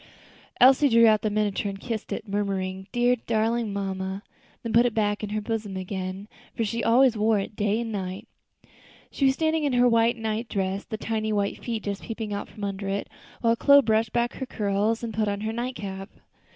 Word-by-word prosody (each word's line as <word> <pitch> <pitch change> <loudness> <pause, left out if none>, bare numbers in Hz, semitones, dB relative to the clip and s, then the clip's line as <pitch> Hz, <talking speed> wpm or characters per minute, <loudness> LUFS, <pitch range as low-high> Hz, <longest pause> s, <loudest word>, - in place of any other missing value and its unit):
Elsie 270 +3 +6
drew 230 -1 +6
out 215 -2 +5
the 215 - 0
miniature 205 -1 0
and 195 0 -7
kissed 225 0 -5
it, 215 - -4
murmuring, 190 -2 -2
"Dear, 245 0 +2
darling 225 0 +1
mamma," 190 0 -3 0.4
then 230 -2 -3
put 235 +2 +5
it 235 - -4
back 205 -1 0
in 210 - -4
her 215 +1 -2
bosom 210 -3 -3
again, 185 +1 -5 0.3
for 230 - 0
she 230 +3 -2
always 245 +1 +5
wore 215 0 +2
it 200 +1 -4
day 210 +1 0
and 230 -1 -4
night. 190 -2 -5 0.8
She 275 - 0
was 265 0 +4
standing 315 0 +1
in 285 -3 +1
her 245 0 +5
white 230 0 +3
night 225 +1 -3
dress, 195 0 -2
the 220 - -5
tiny 220 0 -2
white 200 -1 -1
feet 230 -3 -3
just 200 -1 -4
peeping 220 -2 -5
from 210 - -11
under 200 0 -3
it, 200 +1 -3 0.3
while 230 -1 +3
Chloe 280 +3 +6
brushed 220 0 +1
back 235 +1 0
her 265 - -4
curls 210 +2 0
and 230 -1 -4
put 215 0 0
on 200 0 -2
her 220 +1 -2
night 245 +2 -3
cap. 195 -2 -6
215 Hz, 205 wpm, -26 LUFS, 200-230 Hz, 0.8 s, Elsie